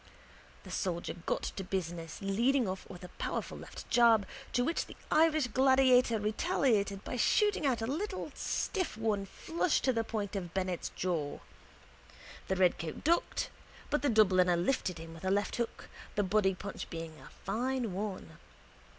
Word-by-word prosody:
The - - -10
soldier 175 -2 -2
got - - 0
to 195 - -4
business, 175 -3 -4
leading 235 +5 +2
off 190 0 -5
with 180 - -10
a 180 - -8
powerful - - -3
left - - -9
jab 235 -4 +6 0.3
to 245 - +2
which 330 - -1
the - - -11 0.2
Irish 310 -2 +4
gladiator 255 -1 +4
retaliated 215 - +1
by 250 - -4
shooting 410 - +3
out 240 -4 +1
a 360 - -3
stiff 370 - -2
one 210 -3 0
flush 330 - 0
to 260 - +2
the 230 -1 +1
point 210 -3 -3
of 175 -3 -5
Bennett's 185 -2 -1
jaw. 165 -6 -1 1.1
The 190 - +1
redcoat 175 -3 +1
ducked 340 +3 +1 0.4
but 295 - +2
the 285 - +2
Dubliner 185 -5 +5
lifted 180 -2 0
him 165 0 -9
with 165 - -12
a 190 - 0
left 200 +1 +1
hook, 235 -1 -3 0.3
the 205 - +2
body 195 -1 +2
punch 200 +2 -6
being 165 -2 -7
a 130 - -13
fine 240 +1 -2
one. 185 -4 -5
210 Hz, 160 wpm, -32 LUFS, 185-255 Hz, 1.1 s, jab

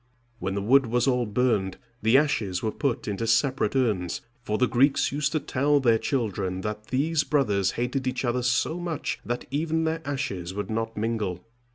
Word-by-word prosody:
When 95 -2 -2
the 100 - -2
wood 130 +4 +5
was 120 +3 +1
all 125 -3 +2
burned, 105 -4 +1 0.2
the 115 +4 +5
ashes 105 -11 0
were 110 - 0
put 140 -2 -2
into 105 +2 -2
separate 115 +1 +2
urns, 105 -10 0 0.2
for 105 -2 -2
the 125 - +3
Greeks 135 +4 +3
used 145 +1 0
to 155 - +2
tell 145 +1 +2
their 115 -4 +3
children 100 -8 -1
that 105 +1 -5
these 150 +4 +1
brothers 105 -10 +1
hated 125 +2 -2
each 130 0 -1
other 120 +1 0
so 125 +7 +1
much 170 -3 -3
that 120 +1 -3
even 160 +3 0
their 160 0 -1
ashes 95 -11 -3
would 105 +2 -4
not 115 0 -2
mingle. 105 -5 -2
120 Hz, 185 wpm, -26 LUFS, 105-140 Hz, 0.2 s, wood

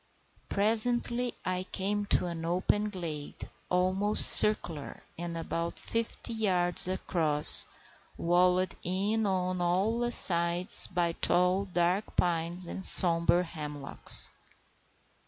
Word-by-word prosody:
Presently 235 +3 -2
I 185 0 -5
came 205 +1 -4
to - - -2
an 170 -2 -8
open 185 +5 -3
glade, 165 -7 -8 0.2
almost 185 +3 -1
circular, 165 -8 +2
and 170 0 -9
about 165 +1 -7
fifty 230 +1 -6
yards 180 -4 +2
across, 160 -5 +5 0.5
walled 180 +2 -1
in 205 +4 -3
on 185 -1 -4
all 210 +7 -3
sides 175 -2 +4
by 175 -2 -3
tall, 180 +3 -2
dark 180 +2 -4
pines 175 +1 -2
and 190 +2 -9
sombre 170 0 +4
hemlocks. 150 -4 0
180 Hz, 100 wpm, -26 LUFS, 170-200 Hz, 0.5 s, across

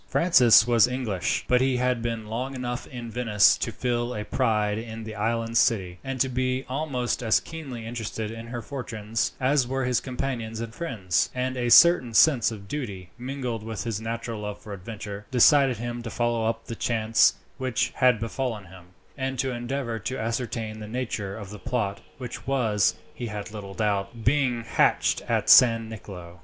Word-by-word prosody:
Francis 125 -10 +6
was 120 -1 +5
English, 120 -9 -2
but 125 0 +3
he 130 -1 +2
had 125 -1 0
been 115 -2 -3
long 125 +5 -4
enough 125 -1 -4
in 120 -3 -7
Venice 110 -4 +4
to 115 - -2
feel 120 +1 -2
a 105 0 -4
pride 105 -1 0
in 115 0 -7
the 110 0 -7
island 115 +2 0
city, 90 -5 +1
and 135 -1 -4
to 130 - +3
be 130 +1 -1
almost 130 -3 -2
as 110 -3 +3
keenly 135 -8 -8
interested 110 -2 -4
in 115 +1 -8
her 120 -1 -5
fortunes 115 -5 -3
as 130 0 +2
were 135 0 -1
his 125 -1 +2
companions 125 -4 -4
and 115 -1 -5
friends; 105 - -1
and 130 +1 -1
a 120 -1 -1
certain 125 -2 +6
sense 135 -6 +5
of 105 -3 -9
duty, 100 -9 -5
mingled 125 -3 -4
with 110 -3 -5
his 110 -2 -3
natural 115 -1 -4
love 105 -1 -5
of 105 - -6
adventure, 100 +1 -8
decided 130 0 +5
him 120 +1 -4
to 115 - -6
follow 120 -1 0
up 115 0 -2
the 115 - -6
chance 115 -1 +3 0.2
which 130 -3 0
had 125 -3 +4
befallen 115 -2 -3
him, 95 -1 -14 0.3
and 130 0 -2
to 130 +1 0
endeavour 120 -1 -3
to 120 +5 -4
ascertain 115 -1 -3
the 105 - -7
nature 110 -4 -4
of 100 -3 -8
the 105 - -8
plot 110 -5 -2 0.2
which 125 +1 -8
was, 115 -7 +2 0.2
he 120 - -5
had 105 0 -6
little 100 -2 -8
doubt, 105 +1 -1
being 125 -2 +1
hatched 115 - +2
at - - +1
San 115 -2 +7
Nicolo. 90 -5 -10
115 Hz, 180 wpm, -26 LUFS, 110-125 Hz, 0.3 s, San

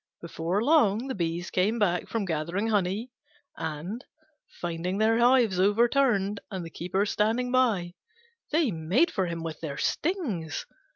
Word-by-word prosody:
Before 170 +4 -2
long 255 -5 +3
the - - -1
bees 170 -2 -3
came 205 +5 +1
back 180 -5 +1
from 225 -3 -2
gathering 170 +6 -1
honey, 205 +3 0 0.4
and, 165 - -5 0.6
finding 175 +2 -2
their 225 +2 +3
hives 240 -6 +4
overturned 210 0 +3
and 185 -4 -5
the 165 - -9
Keeper 185 +5 -1
standing 225 +4 0
by, 220 -9 +2 0.6
they 305 -5 +2
made 185 - +1
for 190 -3 -1
him 170 -1 -4
with 160 -2 -5
their 145 -4 -5
stings. 235 - -2
200 Hz, 140 wpm, -27 LUFS, 170-235 Hz, 0.6 s, hives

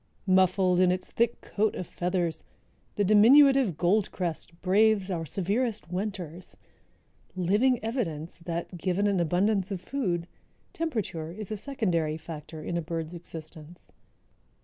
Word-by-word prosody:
"Muffled 185 -1 +3
in 185 -1 +5
its 185 0 -3
thick 235 0 0
coat 215 +1 -1
of 185 - -4
feathers, 175 -2 -2 0.5
the 205 - +1
diminutive 240 - +6
Goldcrest 175 -3 -1
braves 200 +1 +3
our 165 -3 -3
severest 200 - -1
winters, 180 -3 -5 0.8
living 205 +8 +2
evidence 175 - -3
that, 170 +1 -5
given 185 +3 0
an 200 -2 +2
abundance 185 +4 +1
of 195 -3 -3
food, 180 -7 -2 0.5
temperature 215 - -3
is 205 +4 -8
a - - -1
secondary 180 - -1
factor 160 -1 -9
in 170 - -2
a - - -1
bird's 165 0 -4
existence." 160 -1 -11
185 Hz, 125 wpm, -28 LUFS, 170-210 Hz, 0.8 s, diminutive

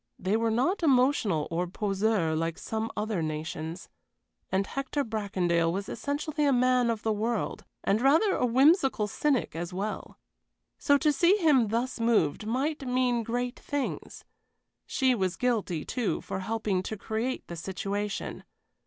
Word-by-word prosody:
They 190 +3 0
were 225 0 +1
not 260 - +1
emotional 255 - +3
or 175 +2 -1
poseurs 195 -3 0
like 165 +1 -1
some 220 0 -3
other 210 -4 -1
nations, 160 +3 -4 0.6
and 190 +1 +1
Hector 275 +4 -2
Bracondale 185 -7 0
was 195 +3 -3
essentially 300 +2 -2
a 285 - +4
man 250 -1 +3
of 225 -2 -2
the 220 - +1
world, 220 +2 -2 0.2
and 205 +3 +2
rather 320 - +4
a - - -1
whimsical 265 - +4
cynic 260 - 0
as 170 +2 -4
well. 205 +3 -4 0.6
So 285 -1 +4
to 295 +2 +2
see 350 +7 +4
him 295 - +4
thus 235 +4 -2
moved 220 -4 +1
must 280 +7 -1
mean 250 -2 +1
great 245 +2 -3
things. 285 -2 -4 0.6
She 260 -2 +2
was 190 -6 -1
guilty, 210 -10 -1
too, 245 -5 -1
for - - -5
helping 210 -1 -1
to 215 +3 -5
create 225 +5 -3
the 170 - -7
situation. 195 +4 -4
225 Hz, 150 wpm, -28 LUFS, 195-260 Hz, 0.6 s, a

